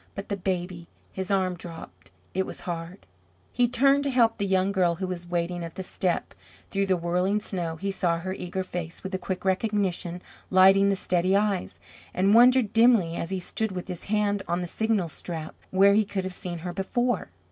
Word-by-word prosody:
But 195 - -6
the 200 - 0
baby 180 -2 -3 0.2
his 190 -1 -4
arm 190 -2 +1
dropped. 165 -1 -10 0.2
It 190 0 0
was - - -8
hard. 170 +2 -6 0.5
He 245 -1 +2
turned 275 +3 +3
to - - +1
help 240 -4 +3
the 200 - 0
young 190 0 +2
girl 180 -3 +2
who 190 - -3
was 180 -1 -5
waiting 175 0 -2
at 165 -1 -7
the 190 - -5
step. 180 -1 -2 0.4
Through 195 0 0
the 185 -1 +2
whirling 180 +4 +1
snow 175 -5 -3
he 195 +4 -3
saw 175 -3 0
her 185 +3 -4
eager 190 0 -4
face, 175 -2 -6
with 190 - -6
a 185 - -1
quick 185 0 -4
recognition 190 -3 -1 0.3
lighting 195 +1 +6
the 200 - +2
steady 185 0 +1
eyes, 200 -2 0 0.4
and 195 +3 +3
wondered 245 -1 +6
dimly, 225 -8 +4
as 170 - -3
he 190 -1 -2
stood 220 +3 -3
with 180 -1 -5
his 180 -3 -6
hand 205 -1 +1
on 175 +1 0
the 175 - -3
signal 220 -1 0
strap, 160 0 -7 0.2
where 195 +1 +5
he 215 +1 +4
could 200 -2 -3
have 185 0 -4
seen 180 -1 -5
her 175 - -3
before. 240 - -1
190 Hz, 200 wpm, -26 LUFS, 175-200 Hz, 0.5 s, lighting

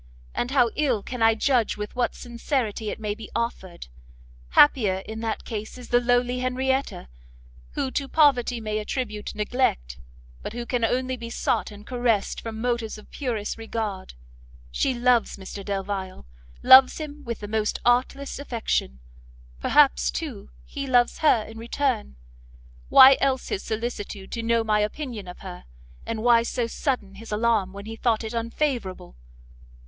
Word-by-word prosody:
and 240 - -2
how 250 -4 +3
ill 255 -9 +1
can 250 -2 -6
I 225 0 +5
judge 240 -2 +1
with 210 +2 -6
what 245 -1 0
sincerity 235 -3 -3
it - - -5
may 210 -1 -2
be 220 0 -10
offered! 190 -7 -4 0.6
happier 205 -10 +4
in 220 0 -6
that 225 -1 -3
case 220 +1 -6
is 250 - -11
the 245 - +4
lowly 245 +1 +1
Henrietta, 260 - -1 0.7
who 265 - -2
to 275 0 -2
poverty 260 -6 +3
may 215 -1 -2
attribute 215 -1 -4
neglect, 210 - -1 0.4
but - - -6
who 240 0 -5
can 245 -1 -1
only 255 +3 0
be 230 -1 -7
sought - - -1
and 205 0 -12
caressed 240 -5 0
from 225 -1 -6
motives 235 -2 -2
of 215 - -15
purest 230 -7 -3
regard. 220 - -4 0.6
She 255 - 0
loves 240 -2 +2
Mr 195 +1 -8
Delvile, 195 - -4 0.4
loves 260 0 +8
him 300 -1 -7
with 235 -2 -5
the 205 - -5
most 215 0 -1
artless 255 +4 +1
affection; 230 - -2 0.6
perhaps, 60 0 +4
too, 60 +2 -5 0.2
he 275 - -6
loves 245 -2 +3
her 290 -8 +4
in 225 +1 -10
return, 235 - -2 0.7
why 265 +1 +9
else 265 -1 0
his 190 - -2
solicitude 215 -3 -5
to 230 - -3
know 230 0 +1
my 215 -1 +2
opinion 215 -1 -3
of 180 - -10
her, 185 -2 -9 0.4
and 220 -1 -3
why 240 -1 +6
so 235 +1 -2
sudden 230 -4 -2
his 225 +3 -11
alarm 210 -3 +1
when 200 +1 -9
he 225 +1 -6
thought 225 -1 0
it 220 +1 -5
unfavourable? 230 - -3
230 Hz, 160 wpm, -25 LUFS, 210-250 Hz, 0.7 s, why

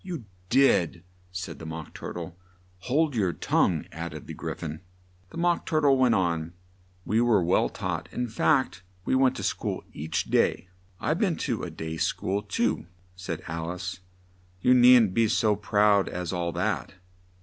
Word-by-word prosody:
"You 170 - -6 0.2
did," 95 - +3 0.3
said 90 -4 -6
the 80 - -8
Mock 80 0 -7
Tur - - -7
tle. 85 0 -7 0.5
"Hold 145 +2 +1
your 95 -6 +1
tongue," - - +1
add 85 0 -6
ed 75 - -8
the - - -7
Gry - - -5
phon. 80 -1 -6 0.5
The - - -10
Mock 175 0 +1
Tur 155 -1 +1
tle 140 -2 +5
went 130 -3 +4
on: 85 -2 0 0.5
"We 110 +3 +2
were 115 -6 +3
well 85 - +2
taught - - -4
in 125 0 -2
fact 130 - +1 0.2
we - - 0
went 130 0 +3
to - - -5
school - - -2
each 80 +2 -2
day 90 - +1
" - - -32
"I've 155 - 0
been 190 -6 +2
to 120 -7 -1
a 90 - -4
day 80 0 -6
school 100 +5 -1
too," 100 -5 -1 0.3
said 90 -3 -5
Alice; 85 +3 -4 0.6
"you 125 - +4
needn't 125 -5 +7
be 115 +1 +3
so 105 0 +2
proud 100 0 +3
as 90 0 -4
all 85 -1 -1
that." 100 +2 -2
95 Hz, 175 wpm, -27 LUFS, 85-125 Hz, 0.6 s, needn't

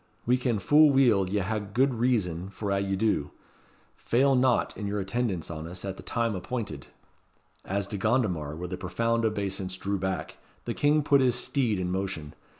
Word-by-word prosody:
"We 125 - +4
ken 125 -3 0
fu' 150 +11 +6
weel 120 -9 +4
ye 100 +1 0
hae 110 +4 -1
gude 120 +7 +1
reason 100 -8 0
for 100 +1 -4
a' 100 - +2
ye 100 0 -1
do. 95 -8 0 0.7
Fail 135 +3 +2
not 125 -1 +2
in 105 - -4
your 105 +1 -2
attendance 95 -4 -2
on 80 0 -6
us 90 +2 -8
at 95 -1 -4
the - - -10
time 115 -1 -1
appointed." 95 - -5 0.8
As 100 +1 -2
De 100 +1 -5
Gondomar 95 - 0
with 90 +3 -6
a - - -3
profound 115 +5 0
obeisance 95 -3 -2
drew 100 +1 -2
back, 95 0 -3 0.3
the - - -2
King 150 +1 +2
put 140 -1 +4
his 125 -2 +3
steed 125 -3 +1
in 90 -1 -2
motion. 95 -6 -3
100 Hz, 185 wpm, -27 LUFS, 95-120 Hz, 0.8 s, fu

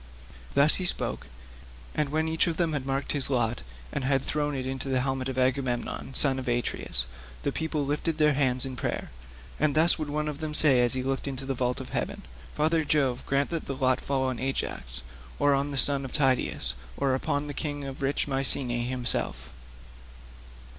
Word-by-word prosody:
Thus 145 +3 +6
he 185 - -1
spoke, - - 0 0.7
and 150 -2 0
when 160 +2 0
each 160 +2 +1
of 165 -2 -2
them 170 -3 +1
had 135 -2 -3
marked 135 +1 -1
his 140 -2 +3
lot, 120 -3 0 0.3
and 140 - -2
had 135 0 +1
thrown 150 -1 -1
it 130 -1 -3
into 135 +1 -4
the 130 -1 +1
helmet 135 0 -1
of 130 - -5
Agamemnon 130 0 -1
son 135 -2 +6
of 130 - -7
Atreus, 120 - 0 0.4
the - - 0
people 160 -2 -2
lifted 150 +3 -1
their 150 -1 +4
hands 130 -2 +2
in 130 -1 -5
prayer, - - -4 0.5
and 150 -1 +2
thus 165 +2 +4
would 155 -2 -3
one 150 +1 -1
of 150 -1 -4
them 155 -1 -3
say 135 -6 +6
as 120 -1 +6
he 130 -1 -2
looked 135 +1 -2
into 135 -1 -4
the 135 - -1
vault 125 -1 -1
of 130 -1 -8
heaven, - - -3 0.3
"Father 160 +2 +2
Jove, 135 -4 +1
grant 140 +2 +1
that 165 -2 -3
the 135 - -3
lot 130 -1 +1
fall 135 -1 -1
on 130 -2 -2
Ajax, 60 - -3 0.3
or 145 0 +3
on 140 +1 0
the 140 - -4
son 140 +1 +3
of 130 - -6
Tydeus, 130 - +1 0.2
or 135 -1 +1
upon 145 +2 -1
the 145 - -5
king 145 0 -3
of 135 0 -7
rich 140 +2 0
Mycene 130 -3 +2
himself." 120 - -1
135 Hz, 200 wpm, -27 LUFS, 130-145 Hz, 0.7 s, Thus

